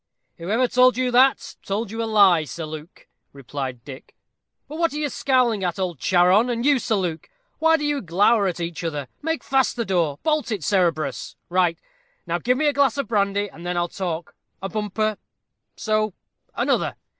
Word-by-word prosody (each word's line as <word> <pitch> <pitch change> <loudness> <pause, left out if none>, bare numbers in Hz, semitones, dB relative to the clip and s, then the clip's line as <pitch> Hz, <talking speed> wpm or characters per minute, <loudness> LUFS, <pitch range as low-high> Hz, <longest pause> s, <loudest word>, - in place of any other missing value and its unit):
"Whoever 220 +9 +1
told 255 0 +4
you 255 -1 0
that, 260 +2 +3
told 200 +2 -3
you 225 +1 -4
a - - -1
lie, 200 -7 +5
Sir 160 +2 -6
Luke," 155 +2 -10 0.3
replied 130 -2 -6
Dick; 135 -2 -11 0.5
"but 305 +3 -8
what 335 -3 +1
are - - -4
you 300 -1 -1
scowling 250 -6 +1
at, 175 -2 -1
old 180 -6 -3
Charon? 185 - +4
and 235 0 -2
you, 285 -2 +4
Sir 225 - 0
Luke? 175 -5 -3 0.3
Why 320 0 +4
do 295 - -3
you 290 -1 0
glower 200 +4 +3
at 180 -1 -3
each 170 0 -4
other? 150 -5 -3
Make 320 +1 -2
fast 265 -1 +1
the 235 - -2
door 170 -7 0
bolt 305 -5 0
it, 200 -7 -3
Cerberus 170 -5 0
right! 175 -2 +2 0.5
Now - - -1
give 250 +1 +1
me 305 - 0
a 295 - +3
glass 280 -3 +2
of 280 - -2
brandy, 205 -1 +1
and 170 -3 -13
then 175 0 -2
I'll 175 0 +1
talk 175 -3 -4 0.3
a 195 - -5
bumper 215 +1 -2 0.6
so 215 -2 -1 0.4
another. - - 0
205 Hz, 190 wpm, -23 LUFS, 175-250 Hz, 0.6 s, lie